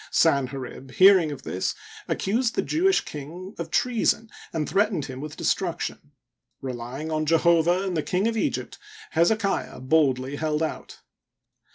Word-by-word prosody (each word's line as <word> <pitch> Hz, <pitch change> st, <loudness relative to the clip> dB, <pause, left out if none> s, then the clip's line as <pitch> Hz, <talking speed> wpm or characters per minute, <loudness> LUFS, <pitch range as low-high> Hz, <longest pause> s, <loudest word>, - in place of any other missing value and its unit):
Sanherib. 135 Hz, -3 st, 0 dB
hearing 185 Hz, -5 st, +6 dB
of 140 Hz, -2 st, -8 dB
this, 95 Hz, -, -2 dB, 0.3 s
accused 230 Hz, +4 st, 0 dB
the -, -, +1 dB
Jewish 375 Hz, +4 st, +2 dB
king 170 Hz, +7 st, -8 dB
of 170 Hz, -1 st, -4 dB
treason 230 Hz, +2 st, +1 dB, 0.2 s
and 155 Hz, -2 st, -2 dB
threatened 200 Hz, -7 st, +1 dB
him 130 Hz, 0 st, -7 dB
with 150 Hz, +1 st, -7 dB
de -, -, -7 dB
struction. 170 Hz, -5 st, -2 dB, 0.5 s
Reljring 130 Hz, +4 st, -5 dB
on 155 Hz, 0 st, -1 dB
Jehovah 170 Hz, +2 st, +3 dB
and 190 Hz, -2 st, -2 dB
the 155 Hz, -, +1 dB
King 185 Hz, +7 st, 0 dB
of 230 Hz, -, -1 dB
Egypt, 220 Hz, -, -2 dB, 0.3 s
Hezekiah 195 Hz, -, +1 dB
boldly 135 Hz, -1 st, +2 dB
held 155 Hz, 0 st, 0 dB
out. 160 Hz, -, -5 dB
160 Hz, 145 wpm, -25 LUFS, 145-195 Hz, 0.5 s, hearing